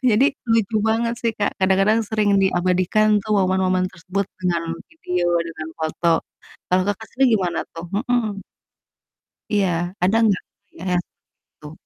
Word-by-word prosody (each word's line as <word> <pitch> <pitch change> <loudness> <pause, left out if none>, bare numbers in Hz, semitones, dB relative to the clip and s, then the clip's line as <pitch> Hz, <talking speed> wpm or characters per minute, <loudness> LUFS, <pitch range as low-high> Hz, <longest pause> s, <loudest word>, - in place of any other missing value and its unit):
Jadi 225 +5 +4 0.3
lucu 225 -1 +2
banget 230 +1 +1
sih 230 -1 0
Kak, 205 - +1
kadang-kadang 195 +4 +3
sering 215 -2 +1
diabadikan 185 +3 +2 0.2
tuh 215 - -2
momen-momen 185 -1 +2
tersebut 185 +3 -3
dengan 175 -2 0 0.3
video 180 - -2 0.2
dengan 160 -1 -7
foto. 160 +2 -1 0.6
Kalau 185 0 +4
Kakak 210 +2 -3
sendiri 265 +1 +3
gimana, 180 -4 -1
tuh? 165 +1 -7 0.2
Mhm. 220 -5 0 1.1
Iya, 195 -2 +3 0.3
ada 190 +5 +3
enggak? 205 -4 +2 0.3
Iya 165 - -13
ya, - - +3 0.6
tuh. 150 -1 -10
195 Hz, 135 wpm, -21 LUFS, 180-220 Hz, 1.1 s, Jadi